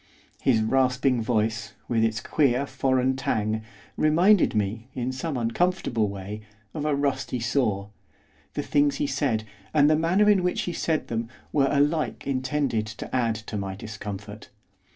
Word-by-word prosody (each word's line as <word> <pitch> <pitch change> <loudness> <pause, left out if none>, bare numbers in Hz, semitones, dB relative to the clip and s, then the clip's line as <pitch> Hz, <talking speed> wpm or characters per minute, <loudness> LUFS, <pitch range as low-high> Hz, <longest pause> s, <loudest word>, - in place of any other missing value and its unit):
His 115 -4 +3
rasping 130 +1 +2
voice, 110 -2 -1
with 115 -2 +1
its 110 -1 0
queer 140 -3 +2
foreign 130 -1 +1
twang, 110 -4 -1 0.3
reminded 170 - +4
me, 105 +3 -1
in 125 0 -2
some 130 +2 -3
uncomfortable 115 - 0
way, 100 +2 -6 0.3
of 150 -2 -3
a 150 -2 +2
rusty 135 -3 -1
saw, 110 -5 0 0.7
the - - -1
things 145 0 +2
he - - -1
said, 135 -5 0 0.3
and 145 0 +6
the - - +5
manner 175 +6 +3
in 205 -3 +5
which 180 0 0
he 175 - -3
said 160 -1 -1
them, 115 0 -3 0.2
were 135 -2 +3
alike 150 +2 +1
intended 130 -4 0
to 110 +4 -6
add 115 -3 +1
to 110 0 -6
my 95 -1 -4
discomfort. 105 0 -7
125 Hz, 150 wpm, -26 LUFS, 110-145 Hz, 0.7 s, and